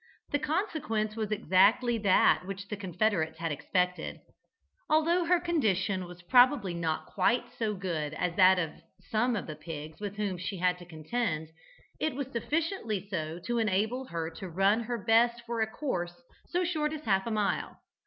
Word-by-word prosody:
The 290 - +2
consequence 300 - -1
was 220 -2 -2
exactly 215 +4 +3
that 190 -2 +4
which 195 0 -6
the 210 - -2
confederates 185 -4 0
had 165 -1 -2
expected. 180 +5 -1 0.7
Although 335 +3 +3
her 355 +1 +4
condition 205 - 0
was 175 0 -12
probably 245 -1 +5
not 165 -2 -2
quite 235 +6 +1
so 215 -2 0
good 160 -6 -3
as 180 0 -1
that 185 0 +6
of 165 -4 -1 0.4
some 240 +2 +2
of 205 - -3
the 155 - -6
pigs 155 0 -8
with 205 -1 -4
whom 200 -4 -2
she 190 +2 -4
had 180 0 +1
to 175 - -11
contend, 160 -1 -2 0.5
it 310 -4 -1
was 275 -1 -4
sufficiently 240 - -2
so 160 -4 -3
to 240 -1 0
enable 220 +5 0
her 165 -5 -4
to 185 +3 -8
run 195 +5 +3
her 240 +1 -2
best 235 +2 +3
for 235 -1 -2
a 220 - +2
course 180 -10 -3 0.3
so 360 +1 0
short 310 -3 0
as 310 - -5
half 195 -1 +2
a - - -2
mile. 210 -2 -1
205 Hz, 175 wpm, -30 LUFS, 180-240 Hz, 0.7 s, that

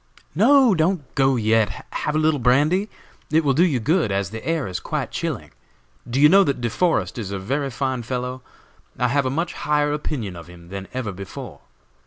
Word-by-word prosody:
"No, 245 - +5
don't 165 -3 0
go 135 0 +3
yet; 110 -2 +1
have 150 - -2
a - - +3
little 155 -1 +2
brandy? 150 - +2 0.4
It 160 +1 +3
will 140 -2 +2
do 160 +6 +4
you 150 -9 +2
good, 150 - +1
as 100 -1 -1
the 110 0 -7
air 165 -3 -1
is 90 -1 -4
quite - - -3
chilling. - - -4 0.6
Do 125 +3 -1
you 150 - +8
know 195 +5 +6
that 140 -7 -1
De 120 -2 -2
Forest 170 -4 0
is 105 -4 -4
a 100 - -2
very 135 +9 -2
fine 130 -1 -2
fellow? 125 +2 -4 0.6
I 125 - +1
have 140 +1 +1
a - - 0
much 165 +6 -2
higher 150 0 0
opinion 130 -10 -4
of 85 -1 -10
him 85 -1 -14
than 95 0 -6
ever 125 -5 -3
before." 95 0 -9
135 Hz, 205 wpm, -22 LUFS, 110-155 Hz, 0.6 s, you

